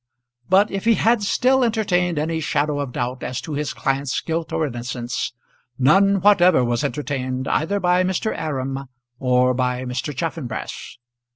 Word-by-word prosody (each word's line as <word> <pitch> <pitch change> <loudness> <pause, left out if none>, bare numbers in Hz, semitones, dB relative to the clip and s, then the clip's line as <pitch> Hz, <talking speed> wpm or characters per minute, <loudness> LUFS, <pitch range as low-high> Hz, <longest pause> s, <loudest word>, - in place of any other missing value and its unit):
But 195 +3 +4
if 195 +1 -4
he 230 -1 +5
had 230 +1 +2
still 255 +5 +2
entertained 180 -7 +1
any 160 +2 -1
shadow 150 -1 0
of 140 -3 -3
doubt 125 +1 -3
as 125 +1 -3
to 155 - -6
his 150 0 -2
client's 135 0 -1
guilt 165 0 -3
or 160 - 0
innocence, 120 -2 -4 0.5
none 195 +9 +4
whatever 180 -8 +5
was 120 0 0
entertained 130 -1 -3
either 200 +6 0
by 180 0 +3
Mr. 190 +4 -1
Aram 135 -3 -3 0.3
or 125 0 +3
by 125 0 -1
Mr. 125 +4 -3
Chaffanbrass. 135 -7 -5
150 Hz, 155 wpm, -22 LUFS, 130-185 Hz, 0.5 s, he